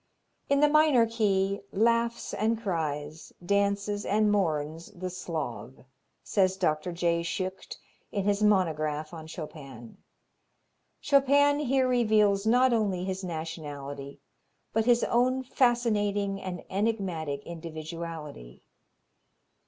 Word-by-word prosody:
"In 280 0 +3
the 295 - +6
minor 300 -5 +5
key 200 -3 0
laughs 230 +2 +1
and 220 +1 0
cries, 155 -6 -3
dances 200 +1 0
and 210 +1 +2
mourns 165 -3 -1
the 185 -1 -5
Slav," 155 -8 -6 0.4
says 190 -2 +1
Dr. 165 -2 0
J. 170 -1 0
Schucht 185 +3 -4 0.3
in 200 - -1
his 205 0 +1
monograph 155 -6 +1
on 160 -1 -8
Chopin. 140 -8 -9 1.0
Chopin 285 +1 +4
here 265 -2 +2
reveals 215 -4 +3
not 250 +2 +4
only 200 -5 0
his 190 0 -4
nationality, 145 -4 -6 0.5
but 225 0 +1
his 240 -1 +4
own 255 +2 +2
fascinating 205 -6 +1
and 180 -2 -6
enigmatic 185 -9 -2
individuality. 160 - -8
195 Hz, 105 wpm, -28 LUFS, 160-225 Hz, 1.0 s, the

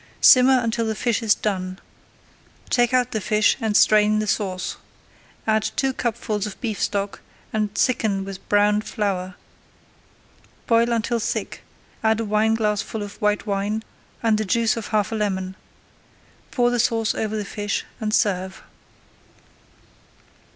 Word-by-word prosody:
Simmer 255 0 +7
until 230 0 -1
the 220 - -1
fish 235 +1 0
is 220 -2 +3
done. 185 -3 -3 0.9
Take 240 -1 +3
out 250 -2 +2
the 220 - -2
fish 210 +1 +3
and 220 -2 +2
strain 215 0 +5
the 215 - 0
sauce. 190 -3 -2 0.7
Add 220 0 +2
two 270 -1 0
cupfuls 215 -4 -2
of 205 - -9
beef 220 -5 -3
stock 200 0 -2 0.3
and 215 -1 0
thicken 210 -6 +1
with 195 -1 -9
browned 210 +1 +3
flour. 185 -4 -3 1.3
Boil 230 0 +3
until 235 +1 0
thick, - - -3 0.4
add 220 0 +3
a 230 - -1
wineglassful 215 0 0
of 205 0 -10
white 210 +1 +1
wine 205 +1 -1 0.4
and 220 -2 +3
the - - 0
juice 225 +3 +1
of 230 -2 -5
half 210 -2 0
a - - -2
lemon. 190 -3 -2 0.9
Pour 245 -1 +2
the 245 - 0
sauce 225 -1 +1
over 220 0 -2
the 210 - -3
fish 205 0 -3
and 215 -2 -2
serve. 190 -3 0
215 Hz, 145 wpm, -23 LUFS, 205-225 Hz, 1.3 s, Simmer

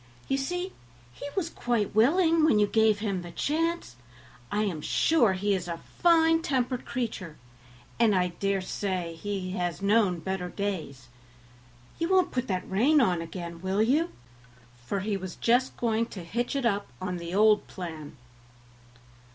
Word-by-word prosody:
"You 270 - +1
see 355 +7 -3 0.4
he 285 - -7
was 360 -4 +1
quite 235 -4 -1
willing 320 - +4
when 310 -9 +5
you 210 - +5
gave 220 0 +3
him 200 -3 -2
the 175 - -8
chance; 320 - -1 0.5
I 210 - +1
am 175 -7 -2
sure 240 - +3
he 200 +2 0
is 180 -2 -2
a 170 -1 -3 0.2
fine 325 -1 +5
tempered 255 -4 -1
creature, 225 -10 -4 0.6
and 225 -4 +4
I 180 -1 +2
dare 195 +2 -1
say 185 -3 -3 0.4
has 175 -3 -2
known 200 -3 +3
better 180 +1 -3
days. 165 -12 -4 0.9
You 335 +1 0
won't 375 -1 +3
put 255 0 -2
that 185 -2 -2
rein 260 +11 +4
on 180 -10 +2
again, 170 0 -7
will 190 +3 +1
you?" 300 +9 +2 0.8
for 195 +8 -1
he 200 0 -1
was 185 -2 -7
just 245 +2 +1
going 230 -1 0
to 190 -6 -8
hitch 240 +10 -2
it 275 -3 -1
up 205 -3 +1
on 185 -1 -3
the 170 +1 -5
old 210 0 +4
plan. 160 -6 -8
205 Hz, 160 wpm, -28 LUFS, 180-255 Hz, 0.9 s, when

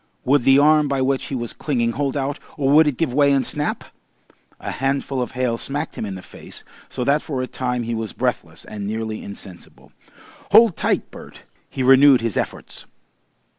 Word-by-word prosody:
Would 135 -1 +2
the 135 0 +6
arm 150 +1 +4
by 135 -1 0
which 135 0 0
he 135 - -5
was 120 -2 -4
clinging 120 -6 -1
hold 140 +2 -2
out, 140 +1 -3 0.2
or 140 -1 +1
would 155 +1 +6
it 140 -5 -1
give 160 -7 -1
way 140 +1 +4
and 135 -2 +2
snap? 150 +4 -2 0.8
A - - -5
handful 135 0 -2
of 125 - -4
hail 125 -2 -1
smacked 145 +3 -4
him 110 - -4
in 95 - -5
the 95 - -9
face, - - -12 0.3
so - - -4
that 140 +4 +2
for 130 -4 -4
a - - -1
time 125 -1 -3
he 115 +1 -3
was 110 -3 -3
breathless - - -3
and 105 -2 -6
nearly 110 0 -4
insensible. 95 -3 -12 0.6
Hold 220 -4 +7
tight, - - -1
Bert! - - -13 0.3
He 130 - -3
renewed 135 0 +6
his 115 -4 -2
efforts. - - -5
135 Hz, 195 wpm, -21 LUFS, 120-145 Hz, 0.8 s, Hold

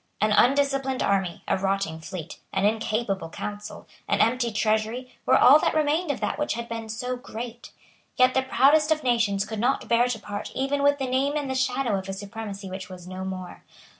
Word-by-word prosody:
An 215 +1 +2
undisciplined 270 +2 +2
army, 190 -3 0
a - - +1
rotting 195 -4 -1
fleet, 165 0 -8
an 195 +1 +1
incapable 215 -4 -1
council, 205 +4 -7 0.2
an - - +1
empty 235 +1 +2
treasury, 220 +4 -1
were - - +6
all 275 +5 +8
that - - 0
remained 310 +2 +1
of 285 - -1
that - - -2
which 295 - 0
had 235 0 -5
been 230 -1 -6
so 250 +3 -3
great. 240 -1 -8 0.5
Yet 255 0 +4
the 265 - +3
proudest 295 +4 +4
of 310 -1 +1
nations 220 -5 +1
could 215 0 -5
not 250 +5 0
bear 235 +1 +3
to 245 -2 -2
part 205 -1 -6
even 275 +2 0
with 285 0 +4
the 270 - -2
name 265 +3 +1
and 285 -3 -2
the - - 0
shadow 255 -5 0
of 190 - -9
a - - -2
supremacy 200 0 -7
which 185 0 -7
was 180 -1 -10
no 185 0 -6
more. 185 -1 -7
230 Hz, 200 wpm, -25 LUFS, 200-265 Hz, 0.5 s, all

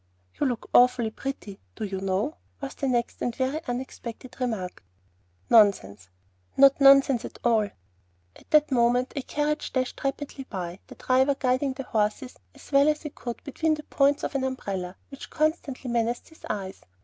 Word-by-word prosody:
"You 290 - +2
look 245 -4 -3
awfully 245 -2 +5
pretty, 220 -6 -6 0.2
do 220 - -6
you 195 -2 -3
know?" 195 - -1 0.2
was 275 -1 -6
the 275 - -3
next 240 -2 -1
and 240 - -1
very 270 +5 -1
unexpected 245 0 -6
remark. 220 - -3 0.6
"Nonsense." 105 - +3 0.5
"Not 275 +1 +6
nonsense 275 -3 +6
at - - -8
all." 220 -4 +3 0.7
At - - -19
that 300 -1 +4
moment 245 0 +2
a 280 - -1
carriage 295 +3 -2
dashed 255 -1 -2
rapidly 275 0 -4
by, 180 -2 -5
the - - -12
driver 265 +2 +2
guiding 260 +1 0
the 270 - -6
horses 225 +3 -2 0.2
as - - -15
well 280 +1 +5
as 300 +1 -1
he 300 - -5
could 240 -3 -7
between 310 +2 0
the 300 - -9
points 280 0 +2
of - - -2
an 275 -1 -1
umbrella, 195 -8 -3
which 275 - -10
constantly 310 -4 -1
menaced 235 0 -1
his 320 - -14
eyes. 195 -3 -4
255 Hz, 170 wpm, -26 LUFS, 220-275 Hz, 0.7 s, Not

